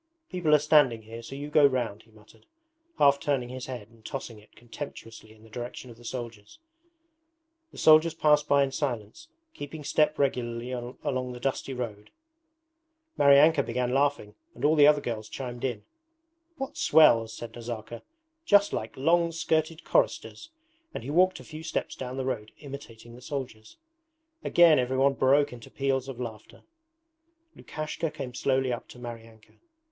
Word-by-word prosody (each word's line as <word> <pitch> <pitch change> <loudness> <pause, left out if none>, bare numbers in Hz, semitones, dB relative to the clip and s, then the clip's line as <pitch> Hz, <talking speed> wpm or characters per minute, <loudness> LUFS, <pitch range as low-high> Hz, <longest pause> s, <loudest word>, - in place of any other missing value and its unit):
'People 170 -5 +3
are - - +7
standing 145 -6 +3
here, 115 +2 -9
so 125 +4 -9
you 145 +1 -7
go 150 -1 +5
round,' 120 -6 +1
he 115 - -25
muttered, 110 - -21 0.5
half 140 -1 +5
turning 140 -5 -1
his 130 0 -7
head 120 -5 -7
and 115 -1 -22
tossing 120 -4 -6
it 105 - -22
contemptuously 115 -3 -10
in 110 0 -19
the 110 - -16
direction 120 +1 -7
of 115 - -14
the 120 - -16
soldiers. 115 -4 -7 1.1
The - - -15
soldiers 155 +1 +5
passed 150 -2 +3
by 140 -1 +4
in 135 - -2
silence, 135 - -4 0.3
keeping 150 +1 -8
step 150 +1 +1
regularly 125 -3 -1
along 125 +1 -4
the 125 - -9
dusty 135 +1 -3
road. 110 -4 -6 1.1
Maryanka 140 +2 +6
began 125 0 -2
laughing 140 -6 0 0.2
and - - -3
all 155 +2 +4
the 145 -1 +7
other 150 -1 +5
girls 110 -4 -5
chimed 125 -2 -6
in. 120 -6 -2 0.7
'What 275 +2 -6
swells!' 115 - +5
said 115 -1 -8
Nazarka, 115 -1 -7 0.4
'Just 205 -8 +4
like 110 - -4
long 170 +4 +2
skirted 160 0 -1
choristers,' - - 0 0.5
and - - -5
he 140 - -5
walked 185 +4 +3
a - - -11
few 155 0 -9
steps 160 0 -3
down 130 0 -6
the 130 - -2
road 110 -5 -3
imitating 125 -5 -10
the 125 - -13
soldiers. 130 - -7 0.7
Again 170 -4 +5
everyone 130 +2 +2
broke 135 +1 +3
into 120 -2 -11
peals 135 -1 -1
of 130 -2 -7
laughter. 110 -3 -8 0.9
Lukashka 155 +1 -4
came 135 -5 -7
slowly 130 0 0
up 120 - -6
to - - -13
Maryanka. 115 -2 -10
130 Hz, 160 wpm, -27 LUFS, 120-150 Hz, 1.1 s, are